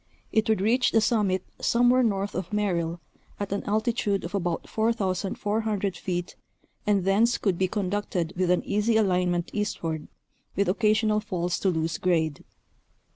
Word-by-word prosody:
It 220 +1 +1
would 220 -3 +2
reach 235 +5 +3
the 225 - +6
summit 210 -5 +1 0.2
somewhere 245 +2 +4
north 205 -3 0
of 185 +1 -4
Merrill 175 -5 -1 0.4
at 205 -1 -4
an 200 - -1
altitude 215 -1 0
of 170 - -6
about 175 -4 -2
4,400 210 -1 -1
feet 175 -1 -4 0.5
and 200 -3 +2
thence 220 +5 +3
could 190 -5 0
be 185 - +2
conducted 185 -3 -2
with 180 0 0
an 180 - +2
easy 210 +2 +2
alignment 180 -4 +1
eastward, 165 -7 -3 0.5
with 200 - +1
occa 210 +3 +3
sional 215 -1 +1
falls 180 -4 -2
to 195 - +1
loose 165 -1 -1
grade. 160 -5 0
200 Hz, 150 wpm, -26 LUFS, 180-215 Hz, 0.5 s, the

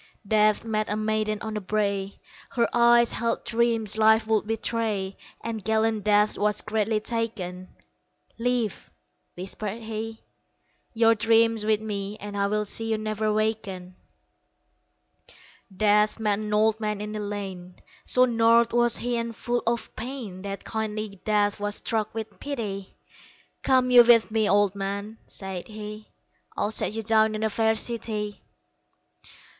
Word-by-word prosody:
Death 215 0 +3
met 215 -1 -1
a 210 - 0
maiden 215 0 -1
on 220 -1 -4
the 210 - -3
brae, 200 -1 -2 0.3
Her 235 -3 +1
eyes 235 0 +5
held 230 0 -1
dreams 225 -2 +1
life 220 0 +5
would 220 -1 +1
betray, 220 -3 -1 0.3
And 225 -2 -5
gallant 220 -1 +1
Death 210 0 +3
was 210 0 +1
greatly 215 0 0
taken 210 -6 -4 0.7
"Leave," 240 -3 -1 0.5
whispered 205 +4 -5
he, 220 0 -6 0.7
"Your 225 0 +5
dream 225 +1 +3
with 215 0 +2
me 205 -1 -4
And 205 0 -7
I 200 0 +1
will 210 +1 0
see 225 +2 -1
you 220 - +1
never 215 0 -1
waken." 210 -4 -2 1.8
Death 210 +1 +3
met 210 -2 +1
an 210 -1 -4
old 215 +1 +3
man 210 -2 -2
in 210 +1 -5
a - - -3
lane; 195 -3 -6 0.3
So 255 0 +4
gnarled 230 -1 +3
was 240 0 +4
he 240 0 -2
and 230 -1 -3
full 240 +2 -1
of 235 0 -1
pain 225 -6 -6
That 195 0 -6
kindly 215 -3 -4
Death 205 -1 +1
was 205 0 -2
struck 220 -1 -1
with 220 -2 -6
pity 210 -9 -5 0.7
"Come 255 -1 +3
you 245 -1 +9
with 230 -2 +5
me, 220 -1 +1
Old 200 0 +3
man," 200 +2 -5
said 190 -2 -7
he, 215 0 -8 0.5
"I'll 210 - 0
set 215 - +1
you 225 0 -3
down 220 0 +3
in 215 - -3
a 220 - +1
fair 220 +2 +2
city." 215 -3 -2
215 Hz, 150 wpm, -26 LUFS, 205-225 Hz, 1.8 s, you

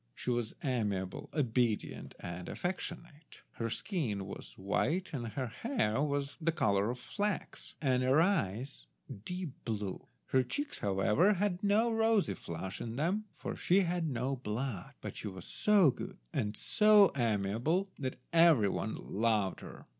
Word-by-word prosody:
She 125 - -2
was 120 -2 -1
amiable, 105 -8 -1
obedient, 120 -6 0
and 85 0 -6
affectionate. 170 -3 -5
Her 115 -1 -3
skin 115 - -2
was 100 - -9
white, 160 - 0
her 130 -1 -3 0.2
hair 230 - +1 0.5
the 165 +1 +2
colour 100 -8 +2
of 125 - -2
flax, 205 - -3
and 130 -4 +2
her 130 +4 +4
eyes 130 - 0 0.4
deep 180 +1 -4
blue; 105 -4 -4 0.2
her 130 - +4
cheeks, 290 - -3
however, 105 - +3
had 195 -1 -1
no 220 +3 +3
rosy 225 -2 +3
flush 95 +4 -6
in 115 0 -4
them, 180 - 0
for - - -4
she 190 +3 +3
had 175 -3 0
no 130 +1 -1
blood, 115 -3 -4
but - - -6
she - - -4
was 95 -3 -7
so 200 -8 +4
good - - -7 0.2
and 105 0 -1
so 210 -2 +6
amiable 120 - +1
that 130 -2 -3 0.2
every 165 -11 +6
one 110 +3 -2
loved 105 -3 0
her. - - -10
130 Hz, 145 wpm, -33 LUFS, -, 0.5 s, so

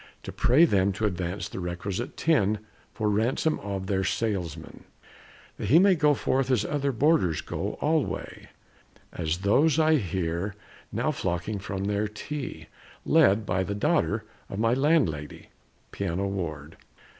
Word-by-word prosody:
To - - -6
pray 140 +8 +4
them 100 - +2
to 105 +3 -2
advance 90 -1 -2
the - - -7
requisite 90 +6 -4
tin 110 -10 +2 0.3
For 110 - -2
ransom 120 +9 +1
of 95 -1 -4
their 95 0 0
salesman, 90 -6 -3 0.7
that 105 - -4
he 140 +10 +6
may 195 +2 +6
Go 150 -3 +3
forth 135 0 0
as 120 -5 +2
other 140 +1 0
boarders 130 - +2
go - - -4
alway 150 - -1 0.6
As 80 -1 -2
those 145 +9 +4
I 160 -1 +4
hear 90 - -2 0.4
now - - 0
flocking 85 +4 -2
from 95 0 -4
their 105 +1 0
tea, 135 +6 -6 0.4
Led 100 +3 +4
by 95 -1 0
the 100 +2 -3
daughter 115 -4 +1 0.2
of 95 - -6
my 115 +2 +2
landlady 130 - 0 0.4
Pianoward. 85 -5 -3
105 Hz, 140 wpm, -27 LUFS, 95-135 Hz, 0.7 s, he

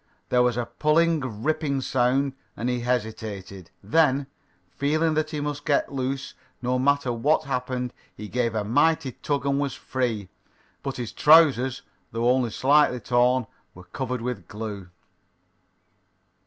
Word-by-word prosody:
There 125 - +4
was 125 -1 +2
a 120 - -1
pulling, 150 -8 +1
ripping 155 -2 0
sound, 130 +2 +1 0.2
and 120 - -2
he 125 0 0
hesitated. 110 -6 -4
Then, 140 +4 +3 0.5
feeling 155 +3 +1
that 155 0 0
he 155 -1 -4
must 145 0 -3
get 145 -2 +1
loose 135 +1 -3 0.3
no 125 0 0
matter 140 -1 +2
what 145 +7 +2
happened, 125 -2 -3 0.2
he 105 - -7
gave 115 0 -1
a 105 - 0
mighty 145 +5 +2
tug 140 +2 -3
and 140 0 +1
was 140 -3 -2
free. 115 -7 -2 0.5
But 135 -1 -4
his 120 -3 -4
trousers, 145 -5 +5 0.3
though 115 +2 +2
only 125 -2 +1
slightly 135 +2 +3
torn, 125 +1 +2 0.3
were 90 - -12
covered 125 +4 -4
with 120 -8 -4
glue. 105 -3 -6
125 Hz, 140 wpm, -25 LUFS, 120-140 Hz, 0.5 s, trousers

